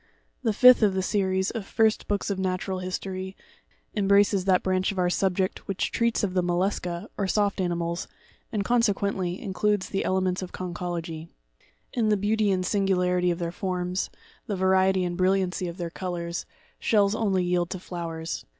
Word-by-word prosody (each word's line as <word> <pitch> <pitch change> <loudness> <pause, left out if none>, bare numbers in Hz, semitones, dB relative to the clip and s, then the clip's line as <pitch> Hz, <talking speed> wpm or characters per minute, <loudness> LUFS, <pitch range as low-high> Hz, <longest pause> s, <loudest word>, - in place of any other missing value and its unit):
The 230 -4 +1
fifth 250 +4 +7
of 205 -3 +3
the 190 - 0
Series 190 -1 +1
of 225 -4 -4
First 220 +2 +1
Books 205 0 -1
of 195 - -2
Natural 185 0 -1
History, 185 +1 -5 0.6
em 205 -2 0
braces 200 -1 +4
that 185 -2 +3
branch 185 +1 +1
of 195 - -8
our 180 -1 +2
subject 190 0 0
which 195 -1 -1
treats 235 -1 +1
of 190 -3 0
the 185 - +2
Mollusca, 175 +1 -1
or 200 - +1
soft 205 0 +1
animals, 170 -1 -2 0.4
and, 205 -3 -1
consequently, 200 -6 +1
includes 205 +1 0
the 195 - -1
Elements 185 0 0
of 185 - -6
Con 180 -1 -5
chology. 165 -2 -4 0.7
In 225 -3 +1
the 210 - +3
beauty 210 +1 +1
and 185 -1 +1
singularity 180 -2 +2
of 170 - 0
their 170 -1 -3
forms, 180 0 -2 0.4
the 205 - -1
variety 190 0 +3
and 175 -1 -2
brilliancy 185 0 +1
of 170 +1 -6
their 170 -3 -4
colours, 175 -2 -4 0.3
shells 205 -2 +3
only 200 -5 +1
yield 175 -1 0
to 185 - -5
flowers. 165 -2 -5
190 Hz, 175 wpm, -26 LUFS, 180-200 Hz, 0.7 s, fifth